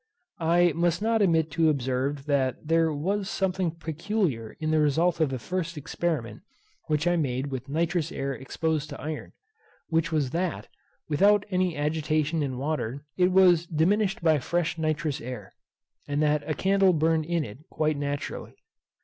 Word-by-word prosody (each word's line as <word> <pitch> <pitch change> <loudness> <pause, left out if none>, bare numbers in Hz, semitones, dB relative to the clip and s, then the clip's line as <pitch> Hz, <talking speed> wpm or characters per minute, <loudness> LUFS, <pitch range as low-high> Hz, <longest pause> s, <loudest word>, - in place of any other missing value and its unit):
I 170 +1 +3
must 170 +1 +1
not 225 0 +2
omit 160 -5 +2
to 160 +1 +3
observe 135 0 -1
that 140 -1 0
there 165 0 +3
was 190 +7 -1
something 185 -2 0
peculiar 165 - -2
in 155 0 -1
the 155 - +3
result 165 +4 +2
of 155 -3 +3
the 130 - -3
first 170 +5 -4
experiment 145 -7 -3 0.5
which 150 +1 0
I 175 0 +3
made 135 -2 -1
with 130 0 -5
nitrous 165 +2 0
air 135 0 -3
exposed 155 +3 -2
to 140 - -8
iron; 155 0 -6 0.6
which 165 0 +1
was 145 -5 0
that, 175 +1 -2 0.4
without 200 +6 +4
any 180 -3 +1
agitation 155 +1 0
in 135 -3 -2
water, 140 -1 -3
it 180 0 +3
was 180 -3 +5
diminished 190 +4 +1
by 160 -3 +4
fresh 170 +4 -1
nitrous 155 -2 -1
air, 125 +1 -7 0.6
and 145 0 -1
that 150 0 +2
a 155 - 0
candle 195 +2 +3
burned 160 0 +2
in 170 -2 0
it 105 +3 -10
quite 155 -1 0
naturally. 145 0 -4
160 Hz, 160 wpm, -27 LUFS, 145-175 Hz, 0.6 s, was